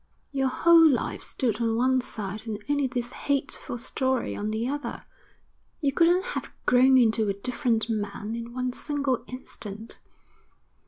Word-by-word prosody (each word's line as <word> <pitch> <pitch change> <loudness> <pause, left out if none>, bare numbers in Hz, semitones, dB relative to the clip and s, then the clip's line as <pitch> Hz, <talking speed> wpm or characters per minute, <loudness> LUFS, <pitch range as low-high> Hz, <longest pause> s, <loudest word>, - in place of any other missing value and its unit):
Your 270 -2 +1
whole 330 +4 +6
life 265 - -1
stood 240 -4 -2
on 225 -1 +1
one 255 +2 +3
side 210 -3 -5
and 215 -2 -2
only 285 -1 +1
this 245 -1 -3
hateful 280 -3 -2
story 260 +1 -1
on 210 +1 -3
the 220 +2 -1
other. 290 +2 -4 0.7
You 285 -3 +1
couldn't 345 +5 +3
have - - -4 0.2
grown 260 +1 +6
into 225 -3 +3
a - - +1
different 230 +1 0
man 210 -1 -3
in 235 0 -5
one 250 0 -2
single 280 -4 -1
instant. 225 -4 -7
250 Hz, 150 wpm, -27 LUFS, 225-270 Hz, 0.7 s, whole